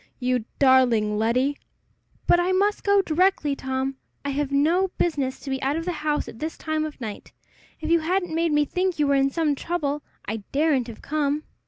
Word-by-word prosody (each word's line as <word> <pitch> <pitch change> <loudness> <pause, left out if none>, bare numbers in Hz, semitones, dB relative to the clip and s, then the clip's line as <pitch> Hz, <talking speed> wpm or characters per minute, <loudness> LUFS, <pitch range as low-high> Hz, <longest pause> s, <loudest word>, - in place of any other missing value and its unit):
You 250 -3 0
darling 245 -6 +4
Letty!" 255 +6 +1 0.7
"But 350 - +5
I 360 +2 +1
must 405 +2 +1
go 400 -1 +4
directly, 325 -4 +2
Tom. 265 0 -3 0.3
I 285 - 0
have 280 0 -1
no 325 +7 +3
business 275 -6 0
to 275 - -6
be 265 0 -2
out 275 +2 0
of 330 +1 -3
the 360 - 0
house 300 -2 -1
at 225 - -10
this 315 +1 -4
time 315 -1 -1
of 310 - -7
the 240 - -6
night. 210 -2 -8 0.5
If 315 +1 -2
you 335 - +5
hadn't 355 +1 -1
made 330 0 +1
me 295 0 +3
think 365 +3 -1
you 300 - +2
were 280 - +2
in 275 0 +3
some 310 0 +1
trouble, 295 -1 -2 0.2
I 220 +2 -3 0.2
daredn't 280 -4 +2
have 230 -2 -10
come." 300 0 0
295 Hz, 205 wpm, -24 LUFS, 265-330 Hz, 0.7 s, But